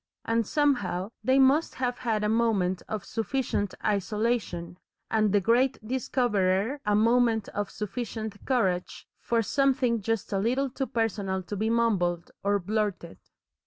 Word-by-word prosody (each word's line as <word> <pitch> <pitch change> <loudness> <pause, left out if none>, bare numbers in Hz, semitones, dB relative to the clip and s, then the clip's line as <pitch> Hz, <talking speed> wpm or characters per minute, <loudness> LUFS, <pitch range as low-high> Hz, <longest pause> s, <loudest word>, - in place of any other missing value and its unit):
And 230 -2 +1
somehow 225 -10 0
they 260 +3 +3
must 275 +4 +4
have 250 -1 -2
had 220 -4 -1
a - - +2
moment 210 -5 +1
of 215 - -4
sufficient 225 -4 -2
isolation, 205 -4 -1 0.3
and 215 -2 +2
the 205 - +4
great 245 +6 +2
Discoverer 230 -2 0
a 210 - +3
moment 230 0 +3
of 205 -1 -3
sufficient 215 -1 -5
courage 190 -9 -1
for 230 -1 0
something 260 -2 +1
just 225 0 -2
a 195 - +1
little 255 +6 0
personal 225 -7 -2
to 205 - -5
be 215 +3 0
mumbled 190 -7 +1
or 200 +1 +2
blurted. 200 -3 -2
220 Hz, 135 wpm, -27 LUFS, 200-245 Hz, 0.3 s, must